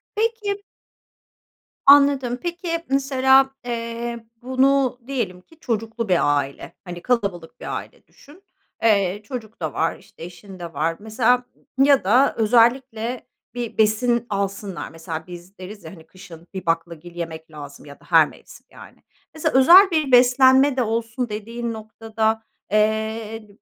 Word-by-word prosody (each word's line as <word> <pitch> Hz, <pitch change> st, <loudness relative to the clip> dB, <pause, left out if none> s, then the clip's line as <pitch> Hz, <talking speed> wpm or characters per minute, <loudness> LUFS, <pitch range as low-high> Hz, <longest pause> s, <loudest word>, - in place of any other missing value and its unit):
Peki 425 Hz, -2 st, -2 dB, 1.2 s
Anladım. 280 Hz, -3 st, +5 dB
Peki, 345 Hz, -1 st, -3 dB
mesela, 270 Hz, 0 st, +3 dB, 0.2 s
eee, 235 Hz, 0 st, -5 dB, 0.2 s
bunu 260 Hz, 0 st, +1 dB
diyelim 205 Hz, -10 st, -3 dB
ki 325 Hz, -, -23 dB
çocuklu 225 Hz, -3 st, -3 dB
bir 145 Hz, -5 st, +3 dB
aile, 140 Hz, 0 st, -5 dB
hani, 175 Hz, -2 st, -8 dB
kalabalık 200 Hz, -9 st, -2 dB
bir -, -, -5 dB
aile -, -, -11 dB
düşün, 310 Hz, +8 st, -19 dB, 0.4 s
eee, 200 Hz, -2 st, +2 dB
çocuk 230 Hz, -4 st, -8 dB
da 155 Hz, -2 st, -3 dB
var, 165 Hz, -, -1 dB
işte, -, -, -15 dB
eşin 180 Hz, +2 st, -11 dB
de 170 Hz, -1 st, -8 dB
var. 160 Hz, +3 st, -1 dB
Mesela 240 Hz, +3 st, +1 dB, 0.4 s
ya 280 Hz, -1 st, +4 dB
da 245 Hz, +9 st, +3 dB
özellikle 235 Hz, +1 st, +1 dB, 0.3 s
bir 240 Hz, -2 st, -5 dB
besin 235 Hz, +2 st, +2 dB
alsınlar, 200 Hz, -1 st, -4 dB
mesela, 165 Hz, 0 st, -7 dB
biz 175 Hz, +2 st, -12 dB
deriz, 190 Hz, +1 st, -10 dB
ya, 160 Hz, -, -9 dB
hani, 165 Hz, -4 st, -14 dB
kışın 170 Hz, -3 st, -14 dB
bir 185 Hz, -2 st, -6 dB
baklagil 170 Hz, +1 st, -3 dB
yemek 160 Hz, -1 st, -7 dB
lazım 145 Hz, -2 st, -11 dB
ya 140 Hz, -1 st, -13 dB
da -, -, -22 dB
her -, -, +6 dB
mevsim -, -, -16 dB
yani. -, -, -15 dB, 0.3 s
Mesela, 315 Hz, -4 st, +1 dB
özel 370 Hz, +8 st, +8 dB
bir 310 Hz, -5 st, 0 dB
beslenme 260 Hz, +2 st, +5 dB
de -, -, +2 dB
olsun 230 Hz, +2 st, -3 dB
dediğin 230 Hz, +3 st, -5 dB
noktada, 220 Hz, 0 st, -3 dB, 0.3 s
eee, 220 Hz, +1 st, -1 dB
225 Hz, 140 wpm, -22 LUFS, 185-260 Hz, 1.2 s, özel